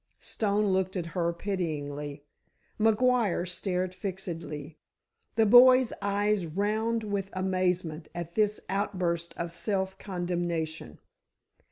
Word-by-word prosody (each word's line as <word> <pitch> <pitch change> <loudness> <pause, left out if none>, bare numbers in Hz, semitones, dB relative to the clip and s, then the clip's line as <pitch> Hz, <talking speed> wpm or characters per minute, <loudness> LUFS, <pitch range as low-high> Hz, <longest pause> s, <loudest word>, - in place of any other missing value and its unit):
Stone 210 -1 0
looked 190 -1 +1
at 180 -3 -2
her 170 -2 +1
pityingly. 150 -6 -4 0.5
McGuire 225 -4 +3
stared 180 0 -2
fixedly; 165 -6 -6 0.6
the 225 - +4
boy's 255 +2 +7
eyes 200 -2 +1
round 215 +6 0
with 200 -2 -2
amazement 185 -4 -1
at 170 -1 -5
this 210 0 +2
outburst 180 -4 -1
of 170 0 -3
self 190 +1 -2
condemnation. 175 - -3
185 Hz, 100 wpm, -29 LUFS, 170-205 Hz, 0.6 s, boy's